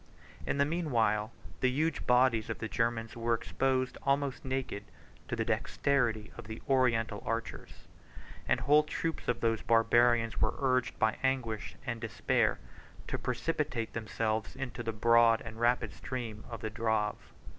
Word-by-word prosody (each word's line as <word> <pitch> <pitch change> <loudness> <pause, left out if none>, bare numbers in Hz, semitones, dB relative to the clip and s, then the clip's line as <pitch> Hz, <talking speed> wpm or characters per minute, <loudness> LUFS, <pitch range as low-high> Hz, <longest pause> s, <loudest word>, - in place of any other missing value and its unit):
In - - 0
the 140 - +4
mean 165 +1 -2
while, 110 -3 +2 0.3
the 130 - +3
huge 150 +4 -1
bodies 125 -3 +4
of - - -2
the 110 - -4
Germans 115 -1 -1
were 115 0 +1
exposed 130 +2 -1
almost 140 -1 0
naked 130 -6 -3 0.4
to - - -2
the - - -1
dexterity 120 -7 0
of - - -9
the 110 0 -6
Oriental 115 -5 +2
archers; 115 +1 -5 0.6
and - - +2
whole 150 +2 +5
troops 160 +2 -3
of 125 - 0
those 115 -1 +1
Barbarians 115 0 +3
were 110 - +2
urged 130 -2 +1
by 110 0 +2
anguish 125 -5 -1
and 115 -2 -3
despair 115 - +1 0.5
to - - -3
precipitate 125 -2 -2
themselves 110 -1 -2
into 130 -2 -5
the 115 -1 -2
broad 115 +1 +5
and 115 0 -9
rapid 120 +1 +2
stream 115 -4 -6
of 115 -3 -7
the 110 - -3
Drave. 110 -1 -1
115 Hz, 155 wpm, -31 LUFS, 110-130 Hz, 0.6 s, whole